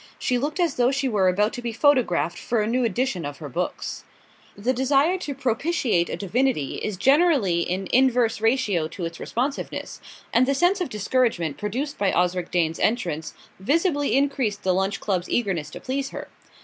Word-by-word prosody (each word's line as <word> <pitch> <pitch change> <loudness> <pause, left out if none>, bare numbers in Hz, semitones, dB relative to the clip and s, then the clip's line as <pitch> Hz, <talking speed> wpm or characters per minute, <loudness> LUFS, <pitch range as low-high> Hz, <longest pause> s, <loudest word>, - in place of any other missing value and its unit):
She 250 -1 0
looked 300 +6 -3
as 340 -5 +1
though 245 0 +4
she 275 0 0
were 205 -6 +2
about 205 +4 +2
to 245 - -5
be 240 -1 -3
photographed 230 - +2
for 235 - -1
a 210 - +1
new 245 +3 +1
edition 230 -4 -1
of 145 -1 -5
her 150 -1 -8
books. 180 +7 -4 0.5
The 235 +6 0
desire 275 +7 +2
to 290 -6 -5
propitiate 255 - 0
a - - -2
divinity 210 - 0
is 210 -3 -4
generally 270 - +3
in 185 +2 -2
inverse 245 -3 +3
ratio 225 -8 +1
to 170 +2 -6
its 165 0 -6
responsiveness, 265 +4 -4 0.3
and 250 +2 +4
the 275 - +2
sense 360 +6 +2
of 355 - -1
discouragement 210 - 0
produced 255 +8 -3
by 200 -2 +2
Osric 180 0 0
Dane's 165 -2 0
entrance 170 -9 -1 0.2
visibly 290 - +1
increased 265 -7 0
the 185 - +2
Lunch 195 +2 0
Club's 185 -4 -2
eagerness 185 -10 -1
to - - -9
please 275 +1 -3
her. - - -8
230 Hz, 180 wpm, -24 LUFS, 185-270 Hz, 0.5 s, though